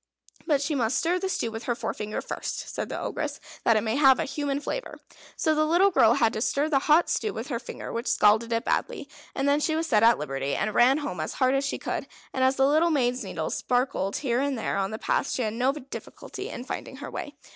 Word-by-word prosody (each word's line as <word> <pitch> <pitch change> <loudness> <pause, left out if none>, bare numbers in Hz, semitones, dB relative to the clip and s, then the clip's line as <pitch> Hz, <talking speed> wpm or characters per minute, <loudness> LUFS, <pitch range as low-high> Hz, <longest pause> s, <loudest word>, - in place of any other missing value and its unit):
"But 290 -4 +2
she 300 - -1
must 255 -2 +1
stir 350 +2 +1
the 380 +1 -2
stew 235 -11 -1
with 225 +1 -7
her 240 - 0
forefinger 210 -2 -4
first," - - -5
said - - -3
the - - -4
Ogress, - - -3 0.2
"that 230 -2 +4
it - - +2
may 225 +3 0
have 270 -3 +6
a - - +1
human 285 0 -2
flavour." - - -5 0.4
So 315 - +1
the 310 0 +2
little 350 +6 +4
girl 230 -8 +5
had 225 - +2
to 220 - -3
stir 285 +5 +1
the 280 -3 +3
hot 315 +3 +6
stew 430 - -1
with 225 +5 -6
her 235 -4 -2
finger, 240 - -8
which 230 +1 -3
scalded 215 +3 +3
it 230 +1 0
badly; - - -1 0.3
and 275 - 0
then 285 +1 +3
she 315 +1 0
was 325 +1 0
set 220 -9 +3
at 230 +1 +6
liberty, 135 -1 -3
and 215 +1 -1
ran 250 +5 +5
home 290 - -4
as 155 - -3
hard 260 -1 +2
as 275 +1 +1
she - - -2
could; - - -4 0.3
and 260 - 0
as 260 +1 +3
the 270 - +3
little 310 +4 +3
maid's 250 -5 +1
needles - - -3
sparkled 245 -6 0
here 245 -4 0
and 280 -2 -1
there 225 - -2
on 195 0 0
the 220 - -5
path, 275 - 0
she 255 - -1
had 215 -1 -2
no 250 +4 +2
difficulty 275 -2 -8
in 245 - -6
finding 265 - -6
her 285 +2 -8
way. 290 - -6
260 Hz, 250 wpm, -26 LUFS, 230-295 Hz, 0.4 s, have